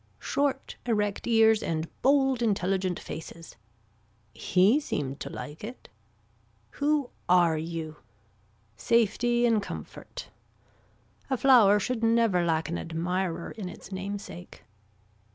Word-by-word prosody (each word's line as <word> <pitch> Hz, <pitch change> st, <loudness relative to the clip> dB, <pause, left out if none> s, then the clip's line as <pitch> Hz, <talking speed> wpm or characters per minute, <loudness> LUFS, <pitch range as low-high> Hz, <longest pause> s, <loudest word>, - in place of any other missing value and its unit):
Short 280 Hz, -1 st, -2 dB
erect 210 Hz, -3 st, 0 dB
ears 225 Hz, -2 st, +5 dB
and 160 Hz, 0 st, -2 dB
bold 270 Hz, -2 st, +3 dB
intelligent 190 Hz, -4 st, 0 dB
faces. 165 Hz, +1 st, -9 dB, 0.8 s
He 190 Hz, -, +3 dB
seemed 140 Hz, -, -4 dB
to -, -, -5 dB
like 150 Hz, +4 st, -8 dB
it. 240 Hz, +4 st, -9 dB, 0.8 s
Who 290 Hz, -2 st, 0 dB, 0.2 s
are 175 Hz, -2 st, +5 dB
you. 160 Hz, -1 st, -5 dB, 0.8 s
Safety 240 Hz, +1 st, +2 dB
in 230 Hz, -2 st, +3 dB
comfort. -, -, -8 dB, 1.0 s
A 265 Hz, -, +1 dB
flower 230 Hz, -6 st, +6 dB
should 235 Hz, +2 st, -2 dB
never 225 Hz, -6 st, +3 dB
lack 160 Hz, -1 st, 0 dB
an 170 Hz, -, -3 dB
admirer 170 Hz, +1 st, -3 dB
in 200 Hz, -5 st, -6 dB
its 180 Hz, -, -12 dB
namesake. 190 Hz, -2 st, -7 dB
200 Hz, 110 wpm, -28 LUFS, 170-235 Hz, 1.0 s, flower